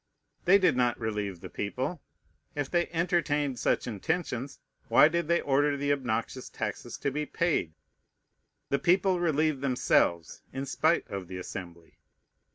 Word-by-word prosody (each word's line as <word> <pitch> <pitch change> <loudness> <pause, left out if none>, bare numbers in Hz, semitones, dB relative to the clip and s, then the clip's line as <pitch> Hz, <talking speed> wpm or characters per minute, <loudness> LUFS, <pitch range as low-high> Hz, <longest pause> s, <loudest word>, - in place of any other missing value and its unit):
They 185 +3 +7
did 185 -8 +3
not 125 -2 +1
relieve 105 -5 -3
the - - -7
people. 130 - -3 0.5
If 145 -2 -3
they 175 -1 +2
entertained 160 -6 0
such - - +1
intentions, 130 - -3 0.3
why - - +7
did 170 0 -1
they 170 +1 +2
order 145 +1 +2
the 145 +1 +1
obnoxious 125 -1 -3
taxes - - -5
to 140 - -1
be 150 +2 -3
paid? 160 - 0 1.0
The 140 - +1
people 180 +4 +3
relieved 155 -4 +1
themselves, 125 -10 +1
in 135 +1 -4
spite 160 +4 +1
of 95 -3 -6
the 90 +1 -6
Assembly. 85 -2 -9
140 Hz, 145 wpm, -29 LUFS, 115-165 Hz, 1.0 s, They